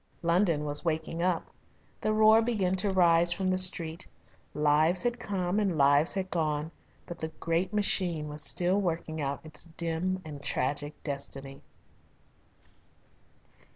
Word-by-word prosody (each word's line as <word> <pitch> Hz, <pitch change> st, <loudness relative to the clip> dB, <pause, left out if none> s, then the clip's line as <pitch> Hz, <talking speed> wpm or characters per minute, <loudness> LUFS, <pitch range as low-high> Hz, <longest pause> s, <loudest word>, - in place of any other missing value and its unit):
London 170 Hz, -3 st, +2 dB
was 145 Hz, 0 st, -1 dB
waking 160 Hz, 0 st, -2 dB
up. 180 Hz, -1 st, 0 dB, 0.6 s
The 215 Hz, -, 0 dB
roar 215 Hz, +1 st, +6 dB
began 210 Hz, -6 st, 0 dB
to 200 Hz, +2 st, +1 dB
rise 170 Hz, -2 st, +4 dB
from 185 Hz, +1 st, 0 dB
the 185 Hz, -, +1 dB
street. 170 Hz, -2 st, +1 dB, 0.5 s
Lives 150 Hz, +5 st, +3 dB
had 240 Hz, 0 st, -1 dB
come 195 Hz, -3 st, -1 dB
and 195 Hz, -6 st, 0 dB
lives 145 Hz, +4 st, +4 dB
had 190 Hz, -1 st, -3 dB
gone, 155 Hz, -2 st, -1 dB, 0.3 s
but 175 Hz, -, -8 dB
the 160 Hz, -, -3 dB
great 170 Hz, +3 st, -1 dB
machine 180 Hz, -6 st, 0 dB
was 150 Hz, 0 st, -6 dB
still 185 Hz, +3 st, +2 dB
working 165 Hz, -3 st, -3 dB
out 140 Hz, +1 st, -4 dB
its 155 Hz, -, -10 dB
dim 170 Hz, +3 st, -1 dB
and 145 Hz, -2 st, -8 dB
tragic 145 Hz, +2 st, -2 dB
destiny. 140 Hz, -1 st, -6 dB
170 Hz, 140 wpm, -29 LUFS, 150-185 Hz, 0.6 s, roar